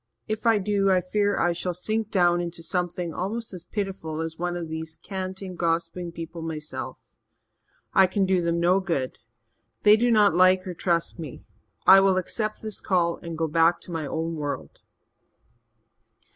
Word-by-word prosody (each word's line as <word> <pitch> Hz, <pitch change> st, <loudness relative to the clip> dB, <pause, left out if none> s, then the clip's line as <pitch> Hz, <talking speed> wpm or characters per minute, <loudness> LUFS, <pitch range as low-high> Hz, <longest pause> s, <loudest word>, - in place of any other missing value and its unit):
If 215 Hz, +1 st, -2 dB
I 225 Hz, -1 st, +5 dB
do, 200 Hz, 0 st, +1 dB
I 185 Hz, -1 st, +4 dB
fear 205 Hz, +3 st, 0 dB
I 175 Hz, -, +2 dB
shall 175 Hz, +1 st, -3 dB
sink 215 Hz, +4 st, -2 dB
down 175 Hz, -3 st, +3 dB
into 170 Hz, -1 st, -5 dB
something 175 Hz, -1 st, -2 dB
almost 220 Hz, +5 st, -3 dB
as 180 Hz, -3 st, -7 dB
pitiful 190 Hz, -7 st, -4 dB
as 160 Hz, 0 st, -3 dB
one 175 Hz, +1 st, -2 dB
of 170 Hz, -2 st, -5 dB
these 160 Hz, 0 st, -5 dB
canting, 190 Hz, -1 st, -6 dB
gossiping 170 Hz, +1 st, -1 dB
people 165 Hz, 0 st, -7 dB
myself. 155 Hz, -1 st, -5 dB, 1.0 s
I 190 Hz, -1 st, +6 dB
can 195 Hz, +1 st, +1 dB
do 185 Hz, -1 st, +2 dB
them 170 Hz, 0 st, 0 dB
no 180 Hz, +3 st, +4 dB
good 165 Hz, -9 st, -2 dB, 0.6 s
they 210 Hz, 0 st, +8 dB
do 240 Hz, +3 st, +2 dB
not 210 Hz, -5 st, +5 dB
like 185 Hz, +2 st, +4 dB
or 185 Hz, -, -4 dB
trust 170 Hz, 0 st, -1 dB
me. 150 Hz, -6 st, -8 dB, 0.4 s
I 195 Hz, -, +9 dB
will 195 Hz, -1 st, +3 dB
accept 215 Hz, +4 st, -2 dB
this 215 Hz, -2 st, -4 dB
call 170 Hz, -3 st, +1 dB
and 165 Hz, -1 st, -7 dB
go 160 Hz, 0 st, 0 dB
back 165 Hz, +2 st, +3 dB
to -, -, -10 dB
my 160 Hz, -3 st, -3 dB
own 165 Hz, +2 st, -2 dB
world." 145 Hz, -, -5 dB
175 Hz, 170 wpm, -25 LUFS, 165-195 Hz, 1.0 s, I